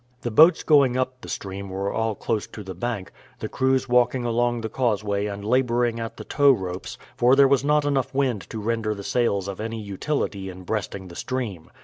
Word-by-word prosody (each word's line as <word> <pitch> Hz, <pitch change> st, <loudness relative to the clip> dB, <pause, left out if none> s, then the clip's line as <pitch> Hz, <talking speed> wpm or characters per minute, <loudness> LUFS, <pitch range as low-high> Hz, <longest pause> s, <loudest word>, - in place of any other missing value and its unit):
The 120 Hz, -, -3 dB
boats 160 Hz, +10 st, +6 dB
going 140 Hz, -5 st, +4 dB
up 130 Hz, 0 st, -2 dB
the -, -, -9 dB
stream 100 Hz, 0 st, -5 dB
were 95 Hz, +1 st, -3 dB
all 110 Hz, -1 st, -1 dB
close 110 Hz, 0 st, -2 dB
to 105 Hz, -, -9 dB
the 95 Hz, -1 st, -7 dB
bank, 100 Hz, 0 st, -4 dB, 0.3 s
the -, -, -4 dB
crews 130 Hz, 0 st, +1 dB
walking 125 Hz, 0 st, +2 dB
along 120 Hz, 0 st, +1 dB
the 110 Hz, -, -3 dB
causeway 105 Hz, -4 st, 0 dB
and 100 Hz, 0 st, -6 dB
laboring 120 Hz, -1 st, +1 dB
at 115 Hz, 0 st, -5 dB
the -, -, -7 dB
towropes, 95 Hz, -11 st, +1 dB, 0.2 s
for 125 Hz, +2 st, +4 dB
there 140 Hz, 0 st, +6 dB
was 135 Hz, -1 st, +3 dB
not 150 Hz, 0 st, +2 dB
enough 140 Hz, -3 st, 0 dB
wind 130 Hz, -8 st, -1 dB
to -, -, -6 dB
render 110 Hz, 0 st, -1 dB
the 100 Hz, -, -8 dB
sails 100 Hz, -4 st, 0 dB
of 100 Hz, -1 st, -6 dB
any 115 Hz, +1 st, -4 dB
utility 100 Hz, -1 st, -3 dB
in 95 Hz, 0 st, -10 dB
breasting 95 Hz, -1 st, -4 dB
the 85 Hz, -, -11 dB
stream. 110 Hz, -11 st, -4 dB
115 Hz, 205 wpm, -24 LUFS, 100-130 Hz, 0.3 s, boats